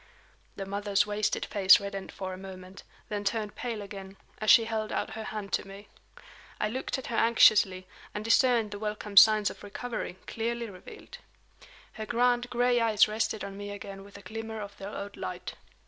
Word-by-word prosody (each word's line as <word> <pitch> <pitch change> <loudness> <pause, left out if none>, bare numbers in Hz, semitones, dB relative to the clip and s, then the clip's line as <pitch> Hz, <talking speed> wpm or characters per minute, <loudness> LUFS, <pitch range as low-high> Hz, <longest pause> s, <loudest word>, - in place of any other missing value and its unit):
The 195 - -5
mother's 200 +1 +1
wasted 210 0 -1
face 190 -2 +6
reddened 200 -1 -6
for 190 -1 -5
a - - -5
moment, 190 0 -10 0.3
then 205 -1 -3
turned 210 0 -2
pale 230 -4 -4
again, 195 -1 -9 0.2
as 215 - -1
she 230 - +8
held 220 -1 -3
out - - -2
her 220 0 -6
hand 210 -2 -6
to - - 0
me. 200 +1 -12 0.7
I 215 - 0
looked 260 +4 -3
at 265 - -7
her 235 - -4
anxiously, 210 -5 +5 0.3
and 210 +1 -5
discerned 230 -2 +3
the 205 - -6
welcome 210 -1 -5
signs 215 0 +7
of - - -13
recovery, 205 -2 -5
clearly 235 0 -3
revealed. 185 -1 -12 0.7
Her 215 0 -6
grand 245 +1 +2
gray 245 0 +2
eyes 220 -2 +4
rested 215 0 -2
on 195 - -6
me 205 0 -6
again 200 -1 -8
with 200 0 -13
a 200 - -14
glimmer 225 0 -6
of 205 -1 -7
their 195 - -6
old 205 -1 -7
light. - - -5
210 Hz, 185 wpm, -29 LUFS, 200-225 Hz, 0.7 s, she